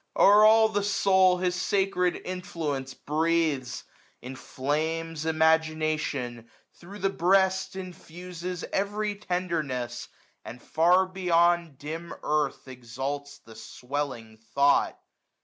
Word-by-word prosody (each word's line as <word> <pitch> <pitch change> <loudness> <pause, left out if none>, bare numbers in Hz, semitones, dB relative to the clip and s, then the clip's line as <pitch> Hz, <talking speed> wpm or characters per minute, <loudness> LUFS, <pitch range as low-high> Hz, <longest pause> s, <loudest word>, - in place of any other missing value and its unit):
O'er 205 +1 +7
all 220 +1 +6
the 205 -2 -1
soul 190 -2 +3
his 180 0 0
sacred 185 -1 0
influence 160 -8 -4
breathes! 155 -5 -1 0.4
Inflames 155 +5 -3
imagination; 155 -6 0 0.2
thro' 190 +4 -12
the 195 0 0
breast 190 +1 +2
Infuses 180 -1 -7
every 205 +1 -1
tenderness; 170 - -3 0.4
and 120 - -9
far 175 +7 +3
loio 185 - -20
Beyond 170 -4 +2
dim 165 +4 -7
earth 150 -3 -1
exalts 130 +3 -6
the 115 0 -16
swelling 125 -2 -6 0.2
thought. 140 0 +3
165 Hz, 100 wpm, -27 LUFS, 145-185 Hz, 0.4 s, O'er